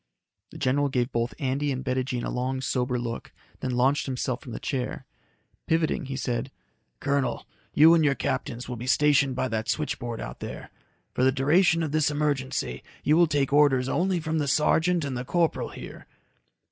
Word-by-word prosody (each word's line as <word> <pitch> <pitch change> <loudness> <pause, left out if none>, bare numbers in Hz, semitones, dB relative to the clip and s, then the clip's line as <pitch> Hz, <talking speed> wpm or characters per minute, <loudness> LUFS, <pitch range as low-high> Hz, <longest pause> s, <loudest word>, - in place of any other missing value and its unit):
The - - -11
general 140 +2 +1
gave 125 -1 0
both 120 +1 -1
Andy 140 0 -1
and 130 0 -4
Bettijean 130 -1 -1
a - - -3
long, 130 +1 -2
sober 125 -1 -1
look, 120 -1 -5 0.3
then 130 - -3
launched 135 +4 +2
himself 130 -1 -2
from 125 - -10
the - - -5
chair. 130 -3 -3 0.6
Pivoting, 160 -2 +1
he 135 0 -5
said, 125 -1 -2 0.5
"Colonel, 140 -3 -1 0.3
you 160 +3 +8
and 165 -2 +4
your 140 -2 +3
captains 130 -3 -3
will 125 - -5
be 120 +3 -6
stationed 140 -1 +3
by 130 - 0
that 110 -1 -2
switchboard 120 -6 -2
out - - -7
there. - - -7 0.4
For - - 0
the 130 - +5
duration 165 +6 +3
of 155 - -2
this 155 -1 +2
emergency, 140 - -1 0.2
you 150 - +4
will 170 0 +5
take 140 -2 0
orders 140 -3 +4
only 180 +5 +1
from 160 0 -1
the 145 - -1
sergeant 160 +3 +2
and 135 -2 -3
the 125 - -3
corporal 170 +4 0
here." - - -10
135 Hz, 185 wpm, -26 LUFS, 125-150 Hz, 0.6 s, you